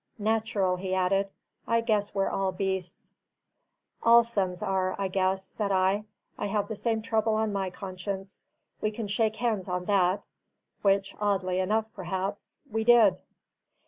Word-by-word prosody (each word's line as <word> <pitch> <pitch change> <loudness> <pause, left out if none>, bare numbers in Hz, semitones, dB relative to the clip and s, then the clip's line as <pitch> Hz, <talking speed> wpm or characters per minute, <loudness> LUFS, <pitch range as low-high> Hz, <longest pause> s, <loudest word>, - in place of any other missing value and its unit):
Natural," 215 -4 +1
he 185 0 -2
added; 195 +2 +1 0.4
"I 230 0 +3
guess 210 -3 0
we're 195 0 +2
all 195 -1 0
beasts." 190 -1 -3 0.9
"All 235 0 +7
sons 195 -5 -2
are, 190 -2 0
I 195 - 0
guess," 190 0 +1
said 200 +1 -3
I. 190 +2 +2 0.3
"I - - -1
have 205 0 0
the 220 - -3
same 220 +1 -1
trouble 220 -1 +1
on 215 -1 0
my 195 -1 -1
conscience: 190 +1 -6 0.4
we 215 - +1
can 215 0 -5
shake 220 +1 +1
hands 220 -5 -1
on 180 0 -2
that." 195 0 +2 0.6
Which 195 -1 +2
(oddly 190 -3 0
enough, 215 +4 0
perhaps) 190 +2 -4
we 220 +1 0
did. 220 -6 +6
200 Hz, 150 wpm, -28 LUFS, 190-215 Hz, 0.9 s, All